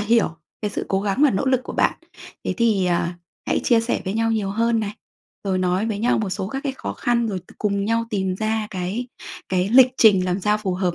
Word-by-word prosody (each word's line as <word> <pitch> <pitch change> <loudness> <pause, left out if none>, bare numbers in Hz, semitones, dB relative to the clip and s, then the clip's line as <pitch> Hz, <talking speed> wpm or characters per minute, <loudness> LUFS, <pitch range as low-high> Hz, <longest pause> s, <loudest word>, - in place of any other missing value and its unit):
hiểu 225 +2 +3 0.3
cái 210 - -1
sự - - -3
cố 195 - +1
gắng 205 +7 0
và 290 - +6
nỗ 200 +7 -1
lực 260 -1 +3
của - - -6
bạn. - - +1 0.5
Thế - - -1
thì, 215 -6 +2
à, 175 0 0 0.3
hãy - - +1
chia 235 -2 +4
sẻ 230 - -1
với 190 - -2
nhau 225 0 +1
nhiều 205 -3 -1
hơn 230 +2 +1
này, 205 -1 -3 0.5
rồi 190 -1 0
nói 185 +4 +1
với 210 -3 -2
nhau 235 +1 +2
một 205 -4 -2
số 190 +1 -3
các 270 +3 -4
cái 275 -2 -2
khó - - -5
khăn, 240 -1 0
rồi 195 -3 -2
t 180 - -18
cùng 200 -1 0
nhau 230 +1 +1
tìm 190 -3 -1
ra 220 +1 -1
cái 190 +6 -3 0.4
cái 185 +1 +1
lịch 255 +2 +6
trình 195 -5 +5
làm 185 +1 -1
sao 210 +2 +2
phù 190 -4 -2
hợp 180 -2 0
210 Hz, 245 wpm, -22 LUFS, 190-230 Hz, 0.5 s, và